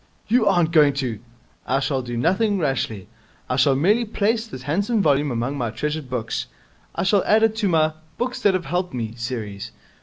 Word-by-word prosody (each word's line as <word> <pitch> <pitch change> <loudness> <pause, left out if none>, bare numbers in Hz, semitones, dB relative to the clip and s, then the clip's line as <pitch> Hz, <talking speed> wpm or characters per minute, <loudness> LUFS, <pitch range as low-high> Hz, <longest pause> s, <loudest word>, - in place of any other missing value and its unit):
'You 230 0 +3
aren't 175 -4 +3
going 150 -3 +5
to 130 -6 -3 0.2
!' - - -34
'I 135 +2 +2
shall 135 -1 0
do 120 -1 -5
nothing 200 - +2
rashly. 130 - -2 0.4
I 125 - -1
shall 135 +1 +4
merely 205 - +3
place 220 +1 0
this 130 - -9
handsome 200 - 0
volume 145 -5 +2
among 125 +3 -2
my 120 -2 -1
treasured 150 +5 -4
books. 115 -3 -3 0.5
I 170 - -1
shall 190 0 +3
add 220 +1 +3
it 225 -1 +3
to 215 -3 +1
my 155 -2 +2 0.2
"Books 250 +1 -3
that 200 -2 +3
have 180 -2 -2
helped 180 -4 -2
me" 115 -2 -3
series. 110 -4 -5
150 Hz, 200 wpm, -22 LUFS, 125-200 Hz, 0.5 s, going